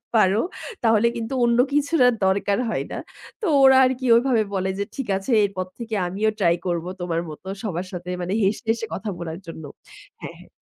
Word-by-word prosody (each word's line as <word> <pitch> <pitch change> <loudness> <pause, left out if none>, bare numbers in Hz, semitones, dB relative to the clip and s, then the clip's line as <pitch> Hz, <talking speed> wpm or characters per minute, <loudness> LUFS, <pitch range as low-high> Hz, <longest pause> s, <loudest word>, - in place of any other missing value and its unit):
পারো, 205 -1 +4 0.4
তাহলে 225 0 +4
কিন্তু 230 +2 -4
অন্য 235 0 +2 0.2
কিছুর 295 +2 +1
আর 250 - +4
দরকার 200 +1 +1
হয় - - -1
না।" - - -4 0.4
তো - - -2 0.2
ওরা 265 0 +7
আরকি 260 0 -1
ওইভাবে 235 -2 +3
বলে 190 0 -1
যে, - - +1
"ঠিক 270 -3 -4
আছে, 195 +7 -5
এরপর 190 -2 -2
থেকে 230 -2 -4
আমিও 200 +5 0
ট্রাই 170 -4 +3
করবো 175 0 -2
তোমার 170 -2 -1
মত 155 - -10 0.2
সবার 185 -3 -3
সাথে 180 -1 -7
মানে 180 +2 -2
হেসে, 195 +2 0
হেসে 225 0 0
কথা 210 - -4
বলার 165 0 -5
জন্য।" 160 -1 -8 0.6
হ্যাঁ, - - -8
হ্যাঁ। - - -16
205 Hz, 190 wpm, -23 LUFS, 180-235 Hz, 0.6 s, ওরা